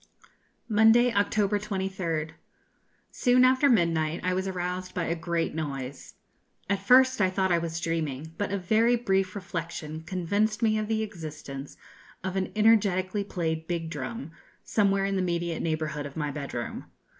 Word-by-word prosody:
Monday, 225 +2 +5
October 205 0 +2
23rd. 190 -6 -2 0.8
Soon 250 0 +4
after 260 +2 +4
midnight 165 - +2
I 185 0 +1
was 190 +1 -1
aroused 185 0 -4
by 180 - 0
a 165 - 0
great 170 0 -2
noise. 140 -4 -5 0.5
At 200 0 0
first 255 +3 +5
I 185 - +4
thought 190 0 0
I 170 - +4
was 165 -1 -3
dreaming, 160 -2 -3
but 205 - -1
a 200 - 0
very 220 +6 +3
brief 195 -5 0
reflection 165 -4 -5
convinced 200 +6 -1
me 215 -1 +3
of 215 - -2
the 220 0 0
existence 155 -8 -8 0.5
of 190 0 -3
an 190 -1 -1
energetically 205 -3 +3
played 160 -4 -3
big 165 -2 -3
drum, 140 +2 -5 0.3
somewhere 200 -2 +2
in 195 0 0
the - - +1
immediate 170 -2 -1
neighbourhood 155 -2 -2
of 140 - -12
my 150 -2 -1
bed 140 -2 -6
room. 120 -1 -4
185 Hz, 155 wpm, -27 LUFS, 160-205 Hz, 0.8 s, Monday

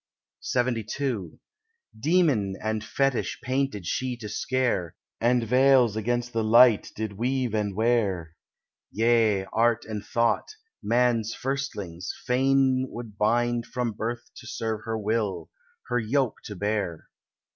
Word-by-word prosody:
LXXII 120 - -1 0.6
Demon 140 - +2
and 110 0 -2
fetish 135 +2 0
painted 130 -6 -1
she 125 +7 -2
to 110 -3 -7
scare, 110 -6 -1 0.2
And 120 +1 +2
veils 125 -1 +4
against 120 +2 -1
the 115 -1 0
light 115 0 +5
did 110 -1 -4
weave 125 -1 0
and 105 -3 -1
wear; 100 -8 0 0.5
Yea, 110 -3 +2
Art 115 0 +2
and 105 -2 -5
Thought, 115 - 0 0.3
man's 120 -2 +1
firstlings, 105 -10 -4
fain 130 0 +2
would 115 -3 -9
bind 120 +2 +1
From 125 -2 -2
birth 115 +3 -5
to 120 - -11
serve 110 -2 -3
her 115 0 -2
will, 105 -2 -2 0.3
her 125 - 0
yoke 125 +2 0
to 105 - -6
bear. 100 -4 -2
115 Hz, 125 wpm, -26 LUFS, 105-125 Hz, 0.6 s, light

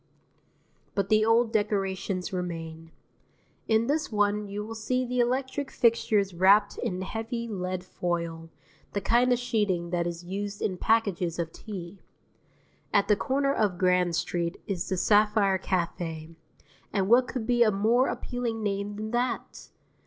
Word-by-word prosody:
But 195 -1 0
the 215 0 +4
old 225 +1 +3
decorations 195 -2 -1
remain. 165 -2 -5 0.8
In 220 +1 +3
this 300 +2 -1
one 210 0 +1
you 205 +1 -5
will 225 - -6
see 250 +3 -1
the 250 0 -2
electric 260 +3 0
fixtures 215 -4 +2
wrapped 200 +4 +4
in 185 0 -2
heavy 225 +3 -4
lead 185 -3 -3
foil, 170 -2 -3 0.4
the 200 - 0
kind 240 +5 +3
of 245 - +4
sheeting 205 -8 -1
that 175 -1 0
is 170 0 -5
used 200 +2 -4
in 185 -3 -1
packages 195 -6 +1
of 165 -2 -3
tea. 190 -2 -8 0.9
At 200 0 +2
the 210 - +6
corner 275 +5 0
of 205 -7 0
Grand 180 -1 +2
Street 170 +2 -2
is 190 -4 -3
the 185 - -1
Sapphire 210 -1 +3
Café, 165 -3 -3 0.6
and 195 -2 0
what 245 +3 +5
could 250 -4 -4
be 240 +1 +2
a 230 - +6
more 220 +6 +3
appealing 235 -3 -3
name 200 0 -2
than 215 +1 -5
that? 240 0 -2
205 Hz, 150 wpm, -27 LUFS, 180-225 Hz, 0.9 s, the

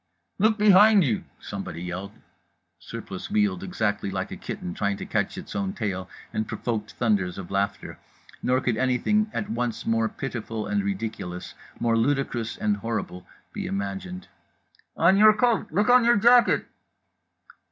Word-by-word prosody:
_" - - -51 0.4
"Look 215 +2 +3
behind 210 0 +7
you!" 120 -8 -1
somebody 85 +2 -6
yelled. 95 +3 -5 0.7
Surplice 95 - -7
wheeled, 205 -3 +1
exactly 110 - -1
like 95 -1 -3
a - - -4
kitten 90 - -6
trying 100 +1 -1
to - - -6
catch - - -1
its - - -8
own 100 -1 -1
tail, 95 -4 -3 0.2
and 110 - -1
provoked 110 -3 -3
thunders 100 -6 0
of 95 -2 -8
laughter. 100 +1 -2 0.4
Nor 130 +1 +1
could 120 -4 0
anything 130 - +1
at 210 - -3
once 120 - -2
more 115 -1 +1
pitiful 115 -4 -5
and 105 -1 0
ridiculous, 100 -3 -4 0.3
more 115 -1 +2
ludicrous 120 -2 0
and 105 -1 0
horrible, 100 -4 -4 0.3
be - - -4
imagined. 95 -2 -4 0.7
"On 180 +4 +5
your 215 +1 +8
coat! 225 -3 +1
Look 205 +6 +2
on 250 -1 +7
your 235 -1 +5
jacket!" 240 +3 +5
115 Hz, 150 wpm, -25 LUFS, -, 0.7 s, your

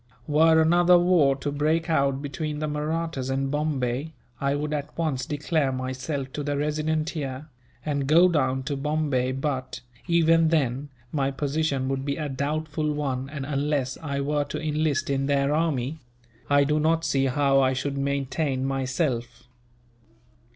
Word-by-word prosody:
Were 160 +2 +5
another 175 +2 +5
war 175 -6 +4
to 145 +1 -4
break 155 +3 0
out 140 -4 +1
between 150 +2 -4
the 155 +1 -2
Mahrattas 150 -2 -2
and 135 +1 -1
Bombay, 145 -1 -1 0.3
I 140 0 +1
would 150 +1 -2
at 150 0 -4
once 145 -6 -1
declare 150 -1 0
myself 130 +1 -4
to 150 - -3
the 145 0 -2
Resident 155 +2 -1
here, 140 -1 -5 0.4
and 140 -3 -1
go 170 +5 +6
down 130 -6 +1
to 140 +2 -2
Bombay 140 -3 0
but, 135 -1 -3 0.3
even 165 -1 +4
then, 145 -3 0 0.2
my 135 -3 0
position 140 -1 -1
would 135 0 -2
be 140 0 -1
a 155 -2 -3
doubtful 150 +2 -2
one 135 -3 -2
and, 140 -2 -5
unless 140 -2 -1
I 140 -3 -2
were 145 +1 0
to 140 - -5
enlist 155 -1 0
in 135 0 0
their 140 0 +2
army, 155 -2 0 0.5
I 145 0 +5
do 150 +2 +1
not 165 +2 +2
see 135 -3 +1
how 135 +1 +3
I 130 0 +3
should 140 +2 -2
maintain 140 0 -1
myself. 130 -2 -2
145 Hz, 160 wpm, -25 LUFS, 135-155 Hz, 0.5 s, go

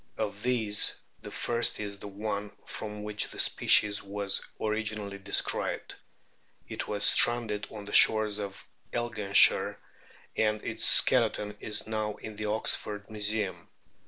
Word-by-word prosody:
Of 105 -1 -5
these 110 -4 +3 0.3
the - - -9
first 120 0 -1
is 100 -1 -6
the 105 - -9
one 100 0 -5 0.2
from 105 -1 -7
which 105 0 -2
the - - -12
species 105 -1 +2
was 100 0 -3 0.2
originally 105 -2 -3
described. 100 +1 -1 0.7
It - - -6
was 105 -1 +3
stranded 115 -4 +4
on 105 -2 -10
the 100 - -8
shores 110 -1 +4
of 100 -1 -8 0.2
Elginshire, 120 -5 +3 0.6
and 110 -1 0
its - - -4
skeleton 105 0 +4
is 105 -1 -5
now 110 -1 -4
in 110 -1 -10
the 105 +1 -6
Oxford 105 -1 -2
Museum. 105 -2 -3
105 Hz, 130 wpm, -28 LUFS, 100-110 Hz, 0.7 s, stranded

